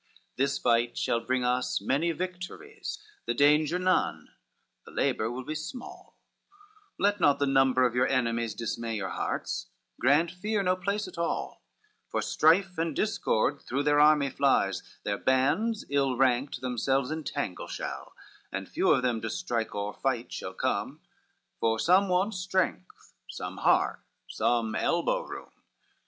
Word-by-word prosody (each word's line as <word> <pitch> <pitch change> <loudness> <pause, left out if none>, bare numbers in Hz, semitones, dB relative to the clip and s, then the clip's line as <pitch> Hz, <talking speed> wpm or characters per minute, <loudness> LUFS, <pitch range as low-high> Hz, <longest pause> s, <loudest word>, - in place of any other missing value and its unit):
XV - - -32
"This 140 +1 +1
fight 120 0 +1
shall 115 - +1
bring 125 +2 -1
us 125 +1 0
many 160 +6 +1
victories, 185 - -6 0.3
The - - 0
danger 150 +3 +4
none, 185 0 0 0.5
the - - -14
labor 110 - 0
will 125 +2 -5
be 155 - -4
small, 155 +11 -8 0.8
Let 205 +1 +2
not 145 -4 +4
the 145 - +1
number 135 -2 +4
of 120 - +1
your 125 +1 +2
enemies 115 -4 0
Dismay 115 0 -3
your 95 -3 -3
hearts, - - -3 0.3
grant 145 +6 +3
fear 205 +3 -1
no 185 0 +2
place 200 +2 -2
at 180 - -9
all; 170 - -2 0.5
For - - -1
strife 180 +3 +3
and 165 -3 -1
discord 145 - 0
through 140 +3 -2
their 145 0 +3
army 150 -2 +5
flies, 140 +1 +2 0.2
Their 100 -1 -2
bands 145 - +1
ill 135 -3 +1
ranked 130 +1 +1
themselves 130 +2 0
entangle 145 - -4
shall, - - -6 0.4
And - - -4
few - - 0
of - - +4
them 120 -3 0
to 115 - -3
strike 120 -8 -2
or 100 0 -3
fight 125 -3 -2
shall - - -6
come, - - -2 0.6
For 110 0 +2
some 185 - +4
want 185 +4 +1
strength, 185 - -2 0.2
some - - -6
heart, - - +2 0.3
some 115 -2 0
elbow - - +1
room. - - -9
140 Hz, 150 wpm, -28 LUFS, 120-180 Hz, 0.8 s, army